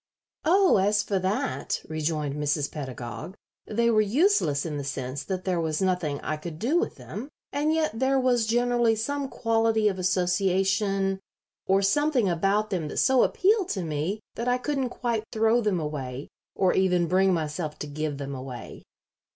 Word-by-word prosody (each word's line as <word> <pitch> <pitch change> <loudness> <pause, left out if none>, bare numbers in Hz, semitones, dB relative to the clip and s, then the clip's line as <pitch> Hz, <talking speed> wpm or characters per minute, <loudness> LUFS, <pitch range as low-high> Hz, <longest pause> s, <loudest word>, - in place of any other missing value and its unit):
"Oh, 370 - +5
as 205 +2 +2
for 195 -2 -1
that," 205 +9 -1
rejoined 155 -2 -2
Mrs. 145 0 -1
Pedagog, 130 - -6 0.3
"they 235 +2 +2
were 215 -1 +4
useless 215 - +2
in 150 -3 -3
the - - -4
sense 130 0 -4
that 185 -2 -4
there 180 -3 0
was 155 -2 -1
nothing 180 -7 0
I 155 - -2
could 155 0 -7
do 275 - +1
with 425 - -2
them, 245 +7 -8 0.2
and 295 +2 +1
yet 315 -8 0
there 265 +1 +3
was 245 -3 +2
generally 240 0 +2
some 275 +5 -2
quality 225 -2 +1
of 190 -2 -1
association 195 +2 +1 0.5
or 195 +1 +3
something 265 +2 +2
about 195 +5 +1
them 175 -5 -1
that - - -6
so 260 -2 +4
appealed 390 -1 +2
to 190 - -2
me 160 +7 -2
that 235 - -4
I 250 0 +3
couldn't 270 0 -1
quite 235 -3 -2
throw 225 +2 +3
them 205 -5 +1
away, 140 -4 -5 0.3
or 185 -2 +2
even 180 -2 +2
bring 190 +3 +3
myself 155 -2 -2
to - - -5
give 150 0 -3
them 140 0 -5
away." 130 -2 -8
195 Hz, 170 wpm, -26 LUFS, 155-235 Hz, 0.5 s, Oh